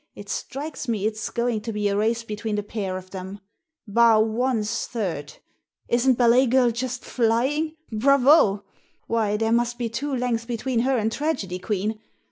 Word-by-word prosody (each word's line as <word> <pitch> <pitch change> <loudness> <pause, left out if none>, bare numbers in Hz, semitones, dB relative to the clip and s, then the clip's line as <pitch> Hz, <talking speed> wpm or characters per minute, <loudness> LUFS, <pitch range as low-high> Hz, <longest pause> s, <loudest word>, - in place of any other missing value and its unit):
It 205 0 -11
strikes 285 +5 -5
me 215 -4 -1
it's 215 0 -2
going 235 -2 -1
to 225 - -4
be 210 -1 -1
a 200 - 0
race 225 +3 +1
between 215 -1 -4
the 210 - -2
pair 200 -3 -4
of 185 0 -11
them. 190 +1 -7 0.5
Bar 225 +1 +5
One's 225 -1 -1
third. 170 -10 -4 0.5
Isn't 245 +1 +3
Ballet 245 +2 +5
Girl 250 0 +4
just 250 +1 -4
flying? 260 +7 0 0.2
Bravo! 250 -2 +4 0.4
Why, 215 -2 0
there 225 +1 0
must 240 +1 +1
be 240 -2 -2
two 270 +5 -3
lengths 240 -2 -1
between 240 +1 -2
her 260 +2 +2
and 220 0 0
Tragedy 225 - -2
Queen 210 +3 -2
230 Hz, 165 wpm, -24 LUFS, 210-250 Hz, 0.5 s, Bar